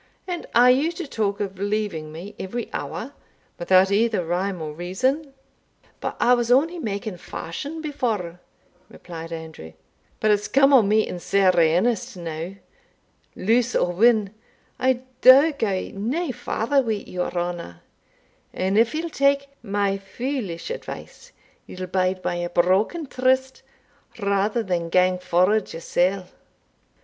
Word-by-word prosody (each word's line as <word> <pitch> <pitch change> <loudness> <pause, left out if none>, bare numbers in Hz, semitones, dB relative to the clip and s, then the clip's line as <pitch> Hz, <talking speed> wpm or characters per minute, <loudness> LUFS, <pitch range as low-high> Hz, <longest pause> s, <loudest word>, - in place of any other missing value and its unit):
And 355 -2 -4
are 245 +1 +7
you 285 +6 +2
to 345 0 -5
talk 210 -7 -2
of 195 -2 -4
leaving 200 -7 -2
me 175 +6 -9
every 235 +5 -5
hour, - - -5 0.5
without 185 +2 +4
either 215 -3 +2
rhyme 180 +2 -1
or 155 -2 -5
reason?" 255 - -1
"Ay, 270 -1 -32
but - - -4
I 245 - +5
was 240 -1 +1
only 325 +7 +3
making 200 - -4
fashion 285 - -6
before," 220 - -3 0.5
replied 165 -1 -9
Andrew; 160 - -8 0.5
"but 215 - +3
it's 210 0 +1
come 275 +1 +4
on 235 -7 +6
me 215 +1 +3
in 180 - -5
sair 195 +1 +3
earnest 180 +6 +2
now 165 +1 -5 0.8
Lose 235 +4 +1
or 175 - +2
win, 215 0 +3 0.5
I 255 -1 +2 0.2
daur 275 +5 +8
gae 215 -10 -2
nae 260 - -2
farther 250 +3 0
wi' 220 -5 -2
your 180 -1 -3
honour; 175 - -4 0.7
and 190 +3 +1
if 230 +6 +2
ye'll 330 +1 -3
tak 280 0 +2
my 200 -2 -1
foolish 210 - -4
advice, - - -8 0.4
ye'll 185 0 -6
bide 185 0 -1
by 175 - -1
a 175 0 -3
broken 190 - +1
tryste, 260 0 0 0.6
rather 205 +2 0
than 175 -4 -2
gang 180 +1 +3
forward 185 +4 +2
yoursell. 180 +3 0
205 Hz, 140 wpm, -23 LUFS, 180-255 Hz, 0.8 s, daur